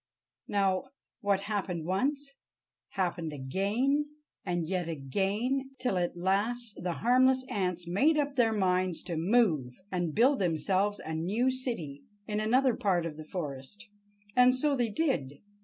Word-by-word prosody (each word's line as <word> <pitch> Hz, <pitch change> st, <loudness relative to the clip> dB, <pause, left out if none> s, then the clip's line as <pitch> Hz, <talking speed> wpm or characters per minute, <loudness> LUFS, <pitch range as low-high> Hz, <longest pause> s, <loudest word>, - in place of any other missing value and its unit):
Now, 195 Hz, +1 st, +1 dB, 0.3 s
what 200 Hz, -4 st, +1 dB
happened 195 Hz, -5 st, -3 dB
once, 275 Hz, -, -1 dB, 0.6 s
happened 175 Hz, -4 st, -1 dB
again, 210 Hz, -, 0 dB, 0.3 s
and 175 Hz, -3 st, -1 dB
yet 180 Hz, -1 st, -1 dB
again, 205 Hz, -, -1 dB
till 250 Hz, -6 st, -1 dB
at 175 Hz, 0 st, -2 dB
last 205 Hz, +6 st, 0 dB
the 175 Hz, 0 st, -1 dB
harmless 260 Hz, +1 st, +4 dB
ants 180 Hz, -7 st, -2 dB
made 280 Hz, -, +3 dB
up 290 Hz, -1 st, 0 dB
their 240 Hz, -4 st, +3 dB
minds 185 Hz, -4 st, +1 dB
to 175 Hz, -, -4 dB
move 160 Hz, -, +2 dB, 0.2 s
and 175 Hz, -4 st, -1 dB
build 260 Hz, +6 st, +4 dB
themselves 190 Hz, +4 st, +1 dB
a 160 Hz, -, -4 dB
new 205 Hz, +11 st, +1 dB
city 230 Hz, -, -4 dB, 0.2 s
in 210 Hz, 0 st, -2 dB
another 250 Hz, +3 st, +3 dB
part 180 Hz, -4 st, +1 dB
of 160 Hz, -2 st, -4 dB
the 155 Hz, 0 st, -9 dB
forest. 155 Hz, +4 st, -6 dB, 0.5 s
And 250 Hz, 0 st, +6 dB
so 285 Hz, +2 st, +1 dB
they 240 Hz, -3 st, 0 dB
did. 205 Hz, -, -1 dB
200 Hz, 140 wpm, -30 LUFS, 175-250 Hz, 0.6 s, And